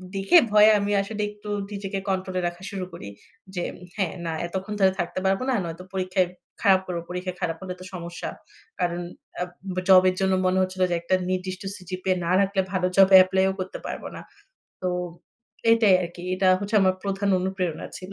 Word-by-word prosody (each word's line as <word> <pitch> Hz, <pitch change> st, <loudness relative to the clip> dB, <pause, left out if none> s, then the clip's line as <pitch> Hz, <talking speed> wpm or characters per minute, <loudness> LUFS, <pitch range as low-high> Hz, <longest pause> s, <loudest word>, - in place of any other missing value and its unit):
দেখে 195 Hz, -, +5 dB
ভয়ে 210 Hz, 0 st, +7 dB
আমি 200 Hz, +1 st, -1 dB
আসলে 210 Hz, +1 st, -5 dB
একটু 210 Hz, 0 st, -11 dB, 0.2 s
নিজেকে 195 Hz, -1 st, -4 dB
কন্ট্রোল 185 Hz, -1 st, -2 dB
এ -, -, -1 dB
রাখা 175 Hz, +2 st, -7 dB
শুরু 190 Hz, -2 st, -4 dB
করি। 170 Hz, -, -8 dB, 0.5 s
যে 175 Hz, -, -1 dB, 0.3 s
হ্যাঁ, 190 Hz, -5 st, 0 dB
না 165 Hz, -, -2 dB, 0.2 s
এতক্ষণ 190 Hz, +4 st, -4 dB
ধরে 190 Hz, -1 st, +5 dB
থাকতে 175 Hz, +2 st, -2 dB
পারব 190 Hz, 0 st, +2 dB
না। -, -, +2 dB
নয়তো 170 Hz, +1 st, -6 dB
পরীক্ষায় 185 Hz, -1 st, +1 dB, 0.3 s
খারাপ 190 Hz, -1 st, +5 dB
করব। 175 Hz, -2 st, -3 dB
পরীক্ষায় 180 Hz, 0 st, -4 dB
খারাপ 165 Hz, -2 st, -1 dB
হলে 185 Hz, -1 st, -5 dB
তো -, -, -9 dB
সমস্যা। 175 Hz, -1 st, -6 dB, 0.5 s
কারণ 175 Hz, 0 st, 0 dB, 0.4 s
আব 180 Hz, +1 st, -6 dB
জবের 185 Hz, -1 st, +7 dB
জন্য 190 Hz, 0 st, +2 dB
মনে 185 Hz, +1 st, +2 dB
হচ্ছিল 185 Hz, 0 st, -2 dB
যে, 175 Hz, -, +1 dB
একটা 185 Hz, +2 st, +1 dB
নির্দিষ্ট 185 Hz, 0 st, -3 dB, 0.2 s
সিজিপিএ 185 Hz, 0 st, -2 dB
না 170 Hz, -, 0 dB
রাখলে 195 Hz, 0 st, +2 dB
ভালো 180 Hz, -1 st, +1 dB
জবে 195 Hz, 0 st, +8 dB
এপ্লাই 190 Hz, +1 st, +1 dB
ও -, -, -5 dB
করতে 185 Hz, 0 st, -5 dB
পারব -, -, -5 dB
না। -, -, -7 dB, 0.6 s
তো 185 Hz, -, -3 dB, 0.9 s
এটাই 220 Hz, -4 st, +5 dB
আরকি। 175 Hz, 0 st, -7 dB
এটা 185 Hz, 0 st, +2 dB
হচ্ছে 205 Hz, +2 st, -4 dB
আমার 185 Hz, 0 st, +3 dB
প্রধান 195 Hz, 0 st, -1 dB
অনুপ্রেরণা 185 Hz, -3 st, -2 dB
ছিল। 185 Hz, +1 st, -9 dB
185 Hz, 185 wpm, -25 LUFS, 180-195 Hz, 0.9 s, জবে